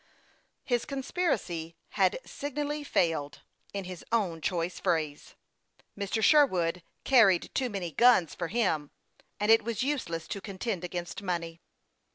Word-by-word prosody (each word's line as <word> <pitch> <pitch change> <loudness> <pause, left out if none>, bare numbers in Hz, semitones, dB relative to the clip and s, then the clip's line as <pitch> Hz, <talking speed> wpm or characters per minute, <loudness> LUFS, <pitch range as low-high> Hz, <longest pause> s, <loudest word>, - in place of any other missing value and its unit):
His 240 -2 0
conspiracy 255 - -2
had 190 -3 +2
signally 295 +1 -4
failed; 160 - 0 0.3
in 200 -1 -4
his 185 -1 -8
own 190 -8 0
choice 170 +1 -2
phrase, 155 -3 -2 0.6
Mr. 200 +2 -2
Sherwood 185 - +4
" - - -46
carried 205 -9 +5
too 260 -2 0
many 190 -6 -4
guns 235 -6 +5
for 170 - -3
him," 165 -9 0 0.5
and 210 +1 +3
it 225 -1 +6
was 230 +1 -2
useless 200 - -2
to 200 - -4
contend 195 -1 -4
against 175 +1 -5
money. 170 -3 -3
190 Hz, 135 wpm, -29 LUFS, 170-240 Hz, 0.6 s, it